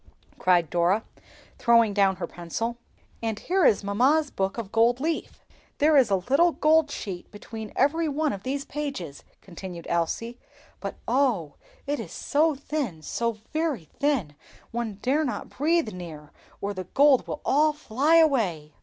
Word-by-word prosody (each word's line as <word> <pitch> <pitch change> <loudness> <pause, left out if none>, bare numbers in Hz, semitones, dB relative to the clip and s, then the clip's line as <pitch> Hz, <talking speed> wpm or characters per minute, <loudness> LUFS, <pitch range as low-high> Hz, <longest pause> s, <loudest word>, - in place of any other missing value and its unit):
cried 175 -3 +3
Dora, 175 +5 +2 0.6
throwing 230 -3 +4
down 195 -1 +3
her 180 - -4
pencil. 200 +9 -4 0.4
"And 225 -2 -2
here 370 - 0
is 210 - +4
mamma's 265 +10 +2
book 195 +2 -2
of 215 -4 -5
gold 235 +2 +3
leaf; 320 +3 -3 0.3
there 300 +1 +4
is 265 -6 +5
a 195 - +3
little 275 - +3
gold 310 0 +3
sheet 190 -10 -6
between 215 0 -8
every 315 +4 +2
one 300 +1 0
of 195 - -6
the 260 +5 -2
pages," 270 - -5 0.2
continued 180 -2 -9
Elsie. 230 +8 -2 0.4
"But - - -5
oh! 235 - +1 0.3
it 290 +1 -2
is - - -7
so 305 +1 +1
thin, 270 - -4
so 235 +6 -1 0.2
very 310 - -1
thin, 275 - +1 0.4
one 230 -3 -3
dare 285 +5 +2
not 260 - -4
breathe 310 -3 +1
near, 160 -5 -9 0.3
or 200 +1 -2
the 185 -1 -6
gold 275 +6 +4
would - - -3
all 305 +3 +4
fly 295 +1 +1
away!" 210 - +2
235 Hz, 155 wpm, -26 LUFS, 190-290 Hz, 0.6 s, is